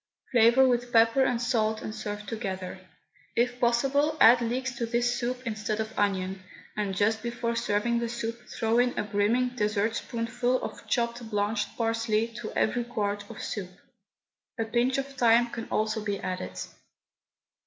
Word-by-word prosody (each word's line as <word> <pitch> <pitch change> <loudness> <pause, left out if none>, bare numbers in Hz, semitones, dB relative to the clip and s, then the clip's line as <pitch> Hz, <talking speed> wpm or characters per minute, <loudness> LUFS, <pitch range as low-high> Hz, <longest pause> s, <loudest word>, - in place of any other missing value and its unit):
Flavour 240 +2 +6
with 245 -1 0
pepper 230 +3 +5
and 245 -2 +1
salt 220 -3 0
and 215 - -5
serve 210 -1 -5
altogether. 195 -4 -5 0.6
If 245 +1 +1
possible 275 +6 +2
add 240 +1 +8
leeks 255 +3 -1
to 235 -3 -1
this 240 +1 +1
soup 250 +1 -3
instead 215 -1 -2
of 220 0 -3
onion, 190 -2 0 0.3
and 205 -2 -2
just 220 +2 +2
before 235 0 -2
serving 235 +1 +1
the 235 0 -2
soup 235 0 -5
throw 225 +1 +1
in 245 0 +2
a - - +1
brimming 210 +5 +1
dessertspoonful 230 +2 -1
of - - -7
chopped 235 -1 -1
blanched 210 0 -1
parsley 225 -1 +1
to 220 - -5
every 240 +2 +1
quart 205 -3 -3
of 230 - -8
soup. 195 -4 -4 0.9
A 225 - 0
pinch 240 +4 +1
of 275 - 0
thyme 240 -3 +3
can 225 -1 -5
also 215 0 0
be 205 -2 -2
added. 185 0 -4
230 Hz, 155 wpm, -28 LUFS, 215-240 Hz, 0.9 s, add